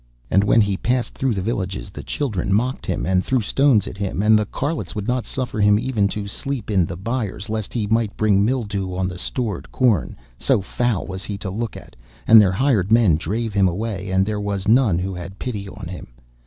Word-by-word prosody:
And 100 - +4
when 105 +3 +4
he 100 -2 +1
passed 125 +3 -1
through 130 -4 0
the 95 - -2
villages 95 -3 -3
the - - -8
children 105 -11 -2
mocked 125 +6 0
him, - - -1
and 95 0 +2
threw 130 -1 +1
stones 125 0 +3
at 95 - -8
him, 100 0 -2
and 110 +1 +5
the 105 -1 +2
carlots 145 +8 -3
would 105 -1 -4
not 125 -1 -1
suffer 125 -4 -3
him 105 0 +5
even 110 -3 +1
to 100 +1 -4
sleep 115 +2 -4
in 95 -5 +3
the 85 - -6
byres 110 0 -3
lest 110 -2 -3
he 115 -4 -1
might 110 0 0
bring 100 -2 +3
mildew 100 -6 -1
on 95 0 0
the 90 -1 -6
stored 110 -3 -3
corn, 115 - +1 0.2
so - - +3
foul 110 +1 -1
was 95 0 -6
he 100 - -4
to 95 -1 -5
look 115 +3 -4
at, - - -13 0.3
and 110 -1 +9
their 95 -3 +3
hired 110 -4 +1
men 115 -8 +5
drave 105 +7 -2
him 100 -2 +4
away, 100 +1 -3
and 95 0 +2
there 105 0 -2
was 100 -1 -3
none 110 -6 +4
who 95 +2 -2
had 90 +2 -8
pity 105 -6 -5
on 100 -3 -8
him. 90 +1 -8
105 Hz, 220 wpm, -21 LUFS, 95-115 Hz, 0.3 s, and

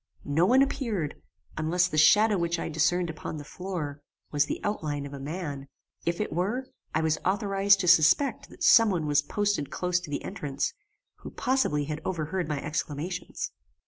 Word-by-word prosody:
No 160 +5 +2
one 260 +5 +6
appeared, 220 - -3 0.4
unless 175 +3 +2
the 155 - -5
shadow 210 +7 +6
which 170 -1 0
I - - -3
discerned 165 +2 +1
upon 160 0 -6
the 145 - -7
floor, 155 -4 -5 0.3
was 145 -1 +2
the - - -3
outline 150 -9 -2
of 140 - -8
a 140 - -6
man. 145 -2 -5 0.4
If 170 0 0
it 210 - -2
were, 205 +10 -1 0.3
I 160 - +2
was 160 -1 +1
authorized 195 0 +3
to 180 - -2
suspect 170 - +4
that - - -9
some 225 -1 +7
one 175 -5 -1
was 145 -1 +3
posted 205 -1 -1
close 180 0 0
to 175 - -10
the 145 - -3
entrance, 145 -8 -3 0.4
who - - -9
possibly 255 - 0
had 150 +2 -4
overheard 180 0 -2
my 150 -2 -2
exclamations. 155 +4 -4
170 Hz, 175 wpm, -28 LUFS, 150-195 Hz, 0.4 s, some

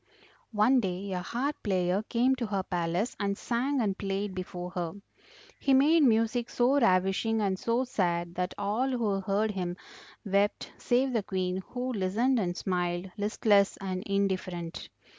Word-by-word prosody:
"One 235 +5 +5
day 190 -2 -3
a 180 - -1
harp 260 +10 -2
player 185 -1 +1
came 240 +4 +2
to 240 -2 -2
her 200 -2 -1
palace 175 +4 -1
and 200 -1 -1
sang 260 +4 -1
and 205 -5 +1
played 195 0 -3
before 180 -1 -6
her; 175 -3 -3 0.7
he 270 - +3
made 305 +5 +5
music 230 -1 +2
so 255 +4 +3
ravishing 195 +1 +2
and 195 -3 0
so 235 +2 +1
sad 175 -8 -1
that 180 +1 -3
all 215 +7 0
who 220 -6 0
heard 205 +3 0
him 180 -3 -3 0.5
wept 200 +1 0
save 255 +1 +1
the 225 - +2
Queen, 185 -2 -2
who 250 +1 -3
listened 225 +6 +1
and 180 -3 -2
smiled, 180 0 -2
listless 205 -1 +2
and 185 -1 -4
indifferent. 185 -4 -2
200 Hz, 155 wpm, -29 LUFS, 185-235 Hz, 0.7 s, One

